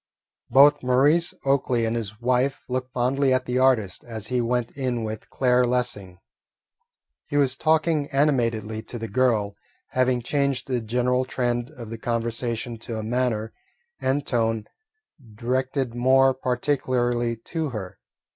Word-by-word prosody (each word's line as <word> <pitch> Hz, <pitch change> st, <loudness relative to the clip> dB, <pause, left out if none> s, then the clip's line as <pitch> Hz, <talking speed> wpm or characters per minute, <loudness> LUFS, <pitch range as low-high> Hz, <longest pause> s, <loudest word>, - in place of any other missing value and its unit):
Both 140 Hz, +2 st, +6 dB
Maurice 140 Hz, +7 st, +3 dB
Oakley 130 Hz, -4 st, +2 dB
and 115 Hz, +1 st, -1 dB
his 105 Hz, -2 st, -4 dB
wife 125 Hz, +3 st, +1 dB
looked 130 Hz, 0 st, -3 dB
fondly 130 Hz, +2 st, +1 dB
at 130 Hz, -, +1 dB
the 125 Hz, +1 st, 0 dB
artist 120 Hz, -8 st, +2 dB
as 110 Hz, -3 st, -6 dB
he 125 Hz, -1 st, +1 dB
went 120 Hz, 0 st, -1 dB
in 125 Hz, -4 st, -2 dB
with 110 Hz, 0 st, -6 dB
Claire 125 Hz, -1 st, +2 dB
Lessing. 120 Hz, -7 st, -2 dB, 1.1 s
He 145 Hz, -, -1 dB
was 135 Hz, -2 st, +2 dB
talking 155 Hz, 0 st, +1 dB
animatedly 115 Hz, -7 st, +1 dB
to 120 Hz, -, -8 dB
the 115 Hz, 0 st, -5 dB
girl, 110 Hz, -3 st, +1 dB, 0.3 s
having 130 Hz, -1 st, +1 dB
changed 140 Hz, +1 st, 0 dB
the 125 Hz, -3 st, -1 dB
general 125 Hz, +3 st, +1 dB
trend 120 Hz, -1 st, -2 dB
of 120 Hz, -7 st, -10 dB
the 115 Hz, -, -6 dB
conversation 115 Hz, 0 st, -3 dB
to 115 Hz, 0 st, -5 dB
a 110 Hz, -, -4 dB
manner 110 Hz, -1 st, -1 dB, 0.5 s
and 140 Hz, +2 st, 0 dB
tone 115 Hz, -3 st, 0 dB, 0.7 s
directed 130 Hz, +2 st, -1 dB
more 130 Hz, +2 st, +4 dB
particularly 125 Hz, -2 st, 0 dB
to 155 Hz, +7 st, -4 dB
her. 100 Hz, -7 st, -7 dB
125 Hz, 140 wpm, -24 LUFS, 115-130 Hz, 1.1 s, Both